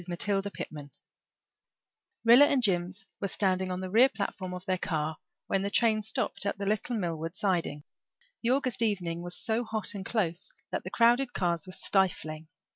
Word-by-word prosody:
MATILDA 195 Hz, +3 st, 0 dB
PITTMAN 150 Hz, -7 st, -7 dB, 1.4 s
Rilla 240 Hz, +5 st, +9 dB
and 275 Hz, -3 st, +2 dB
Jims 185 Hz, 0 st, 0 dB
were 200 Hz, -, -1 dB
standing 185 Hz, -1 st, 0 dB
on 180 Hz, 0 st, -3 dB
the 185 Hz, -, -4 dB
rear 245 Hz, +6 st, +7 dB
platform 195 Hz, -5 st, -4 dB
of 180 Hz, 0 st, -7 dB
their 185 Hz, -2 st, 0 dB
car 155 Hz, -2 st, -2 dB, 0.3 s
when 195 Hz, -, 0 dB
the 200 Hz, -, -1 dB
train 220 Hz, 0 st, +3 dB
stopped 210 Hz, 0 st, -2 dB
at 200 Hz, -, -1 dB
the 200 Hz, -, -4 dB
little 215 Hz, +4 st, 0 dB
Millward 165 Hz, -3 st, -3 dB
siding. 175 Hz, -7 st, -1 dB, 0.6 s
The 230 Hz, -, 0 dB
August 255 Hz, -2 st, +1 dB
evening 180 Hz, -6 st, 0 dB
was 175 Hz, 0 st, -5 dB
so 230 Hz, 0 st, 0 dB
hot 220 Hz, -3 st, -2 dB
and 200 Hz, -2 st, -5 dB
close 185 Hz, -6 st, -1 dB, 0.2 s
that -, -, -2 dB
the -, -, -5 dB
crowded 240 Hz, +2 st, +3 dB
cars 170 Hz, -2 st, 0 dB
were 185 Hz, -, -5 dB
stifling. 160 Hz, -6 st, 0 dB
195 Hz, 175 wpm, -29 LUFS, 175-220 Hz, 1.4 s, Rilla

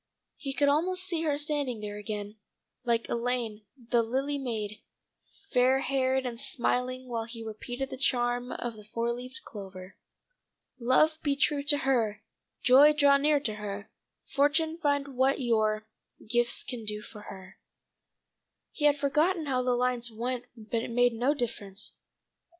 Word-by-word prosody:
He 275 Hz, -, -4 dB
could 285 Hz, +1 st, +3 dB
almost 360 Hz, +6 st, +2 dB
see 340 Hz, -3 st, -1 dB
her 290 Hz, -2 st, +1 dB
standing 290 Hz, -5 st, -1 dB
there 210 Hz, -1 st, -5 dB
again 210 Hz, 0 st, -5 dB, 0.5 s
like 235 Hz, -1 st, +1 dB
Elaine, 235 Hz, -3 st, -1 dB
the 235 Hz, -1 st, +1 dB
lily 270 Hz, +5 st, -1 dB
maid, 215 Hz, -5 st, -4 dB, 0.7 s
fair 255 Hz, +2 st, +4 dB
haired 265 Hz, -1 st, +1 dB
and 240 Hz, -1 st, -4 dB
smiling 255 Hz, -1 st, -1 dB
while 230 Hz, -2 st, -2 dB
he 230 Hz, 0 st, -7 dB
repeated 245 Hz, +5 st, -5 dB
the 265 Hz, -, -5 dB
charm 245 Hz, -2 st, +1 dB
of 240 Hz, -2 st, -4 dB
the 210 Hz, -, -12 dB
four 230 Hz, +2 st, -2 dB
leaf 250 Hz, +1 st, -7 dB
clover: 190 Hz, -2 st, -9 dB, 0.8 s
"'Love 310 Hz, +6 st, +3 dB
be 285 Hz, -2 st, +1 dB
true 285 Hz, +1 st, +2 dB
to 290 Hz, 0 st, +5 dB
her 225 Hz, -6 st, 0 dB, 0.4 s
Joy 275 Hz, +4 st, +8 dB
draw 285 Hz, -2 st, +5 dB
near 295 Hz, +1 st, +3 dB
to 220 Hz, -6 st, 0 dB
her 205 Hz, -1 st, -6 dB, 0.3 s
Fortune 315 Hz, +3 st, +1 dB
find 285 Hz, -3 st, +1 dB
what 265 Hz, +1 st, +2 dB
your 215 Hz, -3 st, +1 dB, 0.4 s
Gifts 240 Hz, +1 st, +1 dB
can 245 Hz, -3 st, -5 dB
do 210 Hz, 0 st, -2 dB
for 210 Hz, -, -11 dB
her 190 Hz, -1 st, -11 dB, 0.6 s
'" -, -, -57 dB
He 295 Hz, -, -1 dB
had 290 Hz, -1 st, +5 dB
forgotten 310 Hz, +5 st, +2 dB
how 260 Hz, -3 st, +1 dB
the 250 Hz, 0 st, +1 dB
lines 245 Hz, -1 st, 0 dB
went 245 Hz, +2 st, -3 dB
but 225 Hz, +1 st, -2 dB
it -, -, -5 dB
made 245 Hz, +1 st, +3 dB
no 250 Hz, +6 st, +1 dB
difference. 210 Hz, -6 st, -3 dB
245 Hz, 155 wpm, -29 LUFS, 225-280 Hz, 0.8 s, Joy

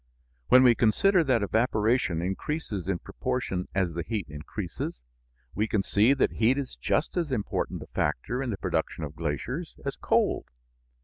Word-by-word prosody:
When 130 Hz, +1 st, +7 dB
we 125 Hz, -2 st, +7 dB
consider 170 Hz, -, +3 dB
that 125 Hz, -6 st, +2 dB
evaporation 110 Hz, -5 st, +1 dB
increases 100 Hz, -, -3 dB
in 95 Hz, -2 st, 0 dB
proportion 95 Hz, -3 st, -3 dB
as 95 Hz, -3 st, +1 dB
the 85 Hz, -, -2 dB
heat 110 Hz, +1 st, -3 dB
increases, 80 Hz, -, -5 dB, 0.5 s
we 105 Hz, +2 st, 0 dB
can 105 Hz, -3 st, +1 dB
see 110 Hz, +9 st, +4 dB
that 135 Hz, -, +2 dB
heat 120 Hz, +4 st, +3 dB
is 140 Hz, -2 st, -4 dB
just 150 Hz, -, 0 dB
as 165 Hz, -5 st, 0 dB
important 110 Hz, -6 st, -2 dB
a -, -, -14 dB
factor 75 Hz, -, -1 dB
in 135 Hz, -, -2 dB
the 100 Hz, -, -2 dB
production 85 Hz, -, -2 dB
of 75 Hz, 0 st, -6 dB
glaciers 85 Hz, -, -3 dB
as 140 Hz, -, -2 dB
cold. -, -, +1 dB
110 Hz, 165 wpm, -28 LUFS, 90-130 Hz, 0.5 s, When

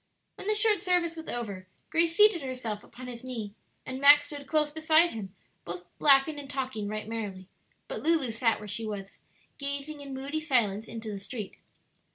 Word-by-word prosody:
When -, -, -9 dB
the 425 Hz, -, +3 dB
short 425 Hz, -1 st, +3 dB
service 350 Hz, -2 st, +1 dB
was 320 Hz, 0 st, -8 dB
over 200 Hz, -6 st, -4 dB, 0.2 s
Grace 330 Hz, 0 st, +2 dB
seated 420 Hz, -5 st, +6 dB
herself 250 Hz, -6 st, -4 dB
upon 255 Hz, -, -11 dB
his 245 Hz, -1 st, -7 dB
knee, 225 Hz, -6 st, -5 dB, 0.3 s
and 260 Hz, +1 st, -5 dB
Max 290 Hz, +1 st, +8 dB
stood 290 Hz, -1 st, -7 dB
close 300 Hz, 0 st, +2 dB
beside 315 Hz, +2 st, +4 dB
him, 200 Hz, -3 st, -7 dB, 0.3 s
both 175 Hz, 0 st, -7 dB
laughing 290 Hz, +1 st, +5 dB
and 280 Hz, -2 st, -9 dB
talking 260 Hz, -6 st, -3 dB
right 215 Hz, 0 st, -4 dB
merrily; 205 Hz, -5 st, -5 dB, 0.4 s
but -, -, -5 dB
Lulu 310 Hz, -7 st, +2 dB
sat 230 Hz, 0 st, +2 dB
where 210 Hz, -, -9 dB
she 220 Hz, +2 st, -2 dB
was, 195 Hz, -2 st, -6 dB, 0.4 s
gazing 280 Hz, +1 st, -4 dB
in 275 Hz, -1 st, -7 dB
moody 280 Hz, +4 st, -3 dB
silence 230 Hz, -9 st, +1 dB
into 225 Hz, -1 st, -6 dB
the 200 Hz, -, -5 dB
street. 210 Hz, 0 st, -6 dB
260 Hz, 185 wpm, -29 LUFS, 215-310 Hz, 0.4 s, Max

